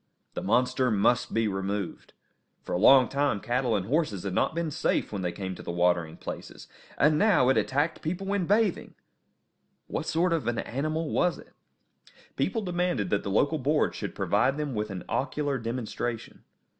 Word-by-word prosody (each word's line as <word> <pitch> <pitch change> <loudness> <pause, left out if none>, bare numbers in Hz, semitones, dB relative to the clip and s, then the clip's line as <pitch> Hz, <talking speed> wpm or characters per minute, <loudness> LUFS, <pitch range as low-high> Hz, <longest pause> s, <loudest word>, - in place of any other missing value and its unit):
The - - -4
monster 125 +4 +2
must 120 +3 +2
be 115 -1 +1
removed. 100 -1 -4 0.5
For - - -5
a 90 - 0
long 130 +5 +7
time 140 -6 0
cattle 120 +1 0
and 95 -3 -1
horses 125 - 0
had 100 -2 -3
not 155 - +1
been 165 -2 -1
safe 140 - 0
when 100 - -3
they 90 -1 -1
came 95 0 -5
to - - -10
the - - -8
watering 85 -2 +1
places; - - -8 0.3
and 150 +1 +4
now 175 - +4
it 135 - +4
attacked 140 +10 0
people 180 +5 -3
when 195 -3 -1
bathing! 210 -2 +1 0.9
What - - -4
sort 170 +2 +1
of 155 -8 -1
an 120 -1 0
animal 155 +5 -2
was 180 - +1
it? - - -15 0.8
People 225 -3 -1
demanded 175 - -1
that 100 - +2
the - - -5
local 145 +10 +2
board 150 +3 +1
should - - -5
provide 135 +2 +1
them 150 -3 -3
with 105 -1 -2
an 95 -2 -6
ocular 140 0 -1
demonstration. 115 0 -4
130 Hz, 180 wpm, -27 LUFS, 105-155 Hz, 0.9 s, long